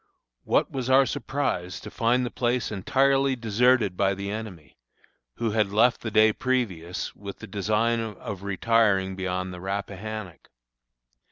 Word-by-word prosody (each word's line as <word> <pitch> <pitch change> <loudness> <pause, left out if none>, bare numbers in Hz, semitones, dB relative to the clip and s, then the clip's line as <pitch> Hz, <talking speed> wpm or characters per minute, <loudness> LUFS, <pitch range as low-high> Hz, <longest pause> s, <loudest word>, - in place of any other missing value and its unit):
What - - +2
was 130 -2 -3
our 135 +1 +6
surprise 130 -10 -2
to - - -9
find 125 +2 +1
the 120 - -4
place 120 -1 -1
entirely 135 +6 +2
deserted 115 -2 +2
by 100 +1 +1
the 100 +1 -4
enemy, 100 -10 -7 0.6
who 115 -2 -1
had 105 -2 +1
left 115 +4 +3
the 110 - -3
day 110 0 +5
previous 100 -11 -2
with 100 -1 -8
the - - -9
design 110 +4 0
of 105 -3 -6
retiring 100 -1 +2
beyond 95 0 -3
the 90 - -9
Rappahannock. 100 -1 -5
110 Hz, 145 wpm, -26 LUFS, 95-120 Hz, 0.6 s, our